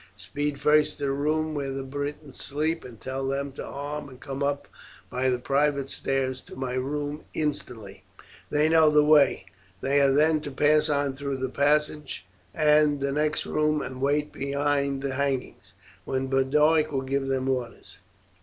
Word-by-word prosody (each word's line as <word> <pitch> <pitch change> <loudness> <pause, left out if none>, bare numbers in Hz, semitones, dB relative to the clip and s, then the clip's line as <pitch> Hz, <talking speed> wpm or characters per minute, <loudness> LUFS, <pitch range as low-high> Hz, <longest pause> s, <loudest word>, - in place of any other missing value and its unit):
Speed 140 +8 -3
first 150 0 +3
to - - -7
the 140 - +1
room 155 +3 0
where 140 -2 -3
the 135 0 -4
Britons 145 +1 -6
sleep, 155 +3 -1
and 120 -3 -11
tell 135 +1 -4
them 140 +1 -2
to 135 - -7
arm 145 +1 -6
and 130 -1 -14
come 135 0 -6
up 140 0 -1 0.4
by 130 +1 +1
the 125 - +1
private 140 +1 0
stairs 130 -1 -1
to - - -13
my 130 -1 -3
room 145 +3 -3
instantly. 125 -9 -4 0.5
They 150 +1 +3
know 160 -1 +5
the 150 0 +4
way. 150 -10 +4 0.3
They 140 +5 +2
are 140 -1 +4
then 155 +2 +3
to 150 - -6
pass 150 +3 +3
on 140 -2 0
through 140 0 -3
the 130 0 -2
passage 145 -6 0 0.3
and 150 -1 +3
the 140 0 -1
next 150 +2 0
room 150 0 +1
and 130 -2 -6
wait 145 +2 +1
behind 140 0 -1
the 135 -1 -2
hangings, 135 -8 -3 0.3
when 130 +5 -2
Boduoc 150 +4 +3
will 135 -2 -1
give 135 +1 -2
them 135 -1 -1
orders. 125 -3 -4
140 Hz, 175 wpm, -26 LUFS, 135-150 Hz, 0.5 s, know